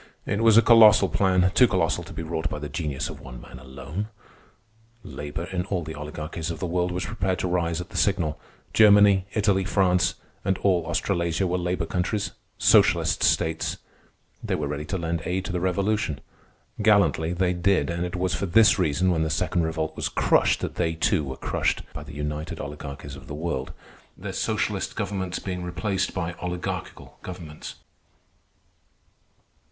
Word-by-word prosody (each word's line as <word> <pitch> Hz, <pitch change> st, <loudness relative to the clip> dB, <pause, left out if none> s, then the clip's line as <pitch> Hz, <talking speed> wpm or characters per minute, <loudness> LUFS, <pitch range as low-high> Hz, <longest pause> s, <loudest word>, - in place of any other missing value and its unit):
It 100 Hz, -, -1 dB
was 115 Hz, -1 st, +6 dB
a 115 Hz, -, +7 dB
colossal 110 Hz, -4 st, +7 dB
plan—too 95 Hz, +5 st, +4 dB
colossal 90 Hz, -6 st, 0 dB
to -, -, -11 dB
be 80 Hz, -, -5 dB
wrought 80 Hz, 0 st, -2 dB
by -, -, -4 dB
the 75 Hz, 0 st, -5 dB
genius 75 Hz, -3 st, -3 dB
of -, -, -8 dB
one 60 Hz, -2 st, -10 dB
man 65 Hz, -, -12 dB
alone. 70 Hz, +10 st, -6 dB, 1.0 s
Labor, 75 Hz, +3 st, -6 dB
in 90 Hz, 0 st, -3 dB
all 95 Hz, -3 st, -2 dB
the 80 Hz, +1 st, -6 dB
oligarchies 80 Hz, +2 st, -5 dB
of 85 Hz, -, -4 dB
the -, -, -4 dB
world, 90 Hz, +1 st, 0 dB
was 90 Hz, +1 st, -3 dB
prepared 95 Hz, -4 st, -1 dB
to -, -, -2 dB
rise 85 Hz, -2 st, 0 dB
at 90 Hz, -, -7 dB
the -, -, -7 dB
signal. 80 Hz, -6 st, +1 dB, 0.3 s
Germany, 100 Hz, -3 st, +6 dB
Italy, 100 Hz, -3 st, +2 dB
France, 90 Hz, -2 st, +2 dB, 0.3 s
and 95 Hz, -1 st, 0 dB
all 90 Hz, -4 st, +1 dB
Australasia 85 Hz, 0 st, 0 dB
were 90 Hz, 0 st, 0 dB
labor 90 Hz, -1 st, -1 dB
countries—socialist 90 Hz, +5 st, +1 dB
states. 80 Hz, 0 st, +1 dB, 0.7 s
They -, -, -1 dB
were -, -, -2 dB
ready 75 Hz, +1 st, -4 dB
to 95 Hz, -, -3 dB
lend 85 Hz, -1 st, -2 dB
aid 90 Hz, +2 st, -2 dB
to -, -, -4 dB
the 90 Hz, -, -1 dB
revolution. 95 Hz, -, 0 dB, 0.6 s
Gallantly 100 Hz, -6 st, +3 dB
they 90 Hz, 0 st, +1 dB
did; 90 Hz, -3 st, +1 dB
and 85 Hz, +1 st, -2 dB
it 90 Hz, +1 st, -4 dB
was 90 Hz, 0 st, 0 dB
for 100 Hz, -, -2 dB
this 105 Hz, +2 st, +5 dB
reason, 90 Hz, +2 st, +2 dB
when 80 Hz, -2 st, +1 dB
the 80 Hz, -, 0 dB
Second 85 Hz, -, 0 dB
Revolt 80 Hz, -1 st, -2 dB
was -, -, -2 dB
crushed, -, -, +2 dB
that -, -, -4 dB
they, 80 Hz, 0 st, 0 dB
too, 80 Hz, -, +1 dB
were 65 Hz, -1 st, -6 dB
crushed -, -, -1 dB
by -, -, -6 dB
the 75 Hz, 0 st, -10 dB
united 75 Hz, +2 st, -4 dB
oligarchies 70 Hz, -1 st, -7 dB
of 70 Hz, -1 st, -13 dB
the 75 Hz, -, -6 dB
world, 75 Hz, -4 st, -3 dB, 0.5 s
their -, -, -6 dB
socialist -, -, -1 dB
governments 95 Hz, -3 st, -3 dB
being 90 Hz, -2 st, -4 dB
replaced 95 Hz, +2 st, -2 dB
by 90 Hz, -2 st, -3 dB
oligarchical 90 Hz, -1 st, -5 dB
governments. 85 Hz, -4 st, -8 dB
90 Hz, 170 wpm, -25 LUFS, 80-95 Hz, 1.0 s, a